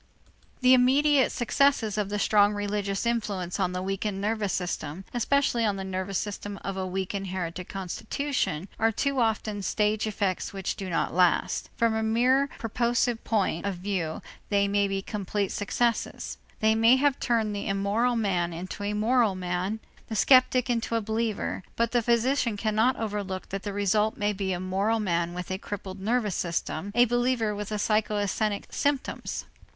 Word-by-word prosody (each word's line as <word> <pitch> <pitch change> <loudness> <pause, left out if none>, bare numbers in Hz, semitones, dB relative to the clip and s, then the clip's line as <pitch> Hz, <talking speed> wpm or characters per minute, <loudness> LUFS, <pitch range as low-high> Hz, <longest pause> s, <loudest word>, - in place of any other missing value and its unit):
The 255 0 +6
immediate 270 +2 +4
successes 240 -3 +2
of 210 -2 -1
the 205 - -1
strong 205 0 +4
religious 205 0 -2
influence 205 -6 -1
on 185 -2 +1
the 180 0 -3
weakened 195 +1 -2
nervous 210 -1 -1
system, 175 -1 -3
especially 245 0 +2
on 205 -3 +1
the 195 - -4
nervous 190 0 -3
system 205 -1 -4
of 195 - -3
a 190 -1 -2
weak 190 +1 -3
inherited 185 -3 -4
constitution, 195 - -2
are 225 0 +3
too 275 +4 0
often 215 -2 0
stage 210 +2 +1
effects 200 -3 -2
which 195 -1 -3
do 190 -2 -5
not 165 - 0
last. 180 0 +2
From 230 -1 +2
a 220 - 0
mere 250 +5 +3
purposive 235 +1 0
point 200 -6 0
of 200 - -2
view, 180 -3 -3 0.3
they 200 -1 +3
may 200 0 +2
be 195 0 -2
complete 200 -1 -2
successes. 230 +3 -1 0.2
They 220 0 +4
may 225 +3 +6
have 275 0 +2
turned 220 -4 0
the 200 - -4
immoral 200 +5 +1
man 180 -6 0
into 180 +4 -6
a 205 +1 -1
moral 220 -1 +2
man, 185 +4 -2 0.3
the 220 - -4
skeptic 255 +2 +5
into 230 -2 -1
a 230 - +1
believer, 220 -1 -2
but 235 0 +1
the 240 - +3
physician 235 0 +1
cannot 220 +4 +2
overlook 205 -4 -4
that 195 0 -4
the 205 - -4
result 205 +2 +1
may 205 0 +1
be 195 -1 -2
a 180 - -1
moral 195 +5 0
man 170 -4 0
with 180 +1 -5
a 185 - -2
crippled 195 -2 -6
nervous 215 -1 +1
system, 170 +2 -2
a 240 +1 +6
believer 240 -2 +1
with 205 -1 -5
psychasthenic 210 -1 0
symptoms. 285 -2 -1
210 Hz, 165 wpm, -27 LUFS, 195-230 Hz, 0.3 s, The